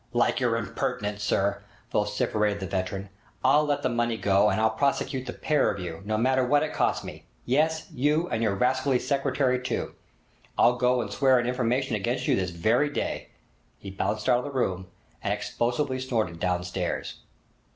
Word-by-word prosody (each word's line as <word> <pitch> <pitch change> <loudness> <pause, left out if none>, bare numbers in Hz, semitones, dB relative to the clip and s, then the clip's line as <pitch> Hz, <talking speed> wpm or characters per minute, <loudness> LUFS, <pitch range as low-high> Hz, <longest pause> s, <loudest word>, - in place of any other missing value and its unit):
'Like - - +2
your - - +1
impertinence, 105 0 -3
sir!' 100 -1 0 0.3
vociferated 105 0 0
the 95 - -4
veteran. 95 +2 -3 0.4
'I'll 145 +3 +5
let 145 -1 -1
the - - +3
money 120 -1 0
go, 100 0 +3
and - - 0
I'll 110 0 +3
prosecute 135 -2 -1
the - - -2
pair 150 -1 +1
of - - -3
you, 85 -2 -6
no 110 +1 0
matter 130 +3 +2
what 145 +4 +3
it 155 - -3
costs - - +1
me! - - -9 0.2
Yes, 155 +5 +1
you, 150 +6 +1
and 110 - -1
your 105 -4 +1
rascally 130 +4 +2
secretary 135 -1 0
too! 125 -1 -3 0.6
I'll 125 - +5
go 125 0 +2
and 105 -3 -5
swear 130 0 +4
an 120 - +1
information 125 0 0
against 120 +5 -2
you - - +4
this 95 -2 -1
very 110 - +2
day!' 145 - -3 0.5
He 100 - -9
bounced 105 +2 -2
out 125 -1 +4
of - - -5
the 145 - -5
room, 95 -9 -1 0.3
and - - -1
explosively 130 +3 -1
snorted 110 -10 -2
downstairs. 90 0 -2
120 Hz, 180 wpm, -27 LUFS, 100-130 Hz, 0.6 s, I'll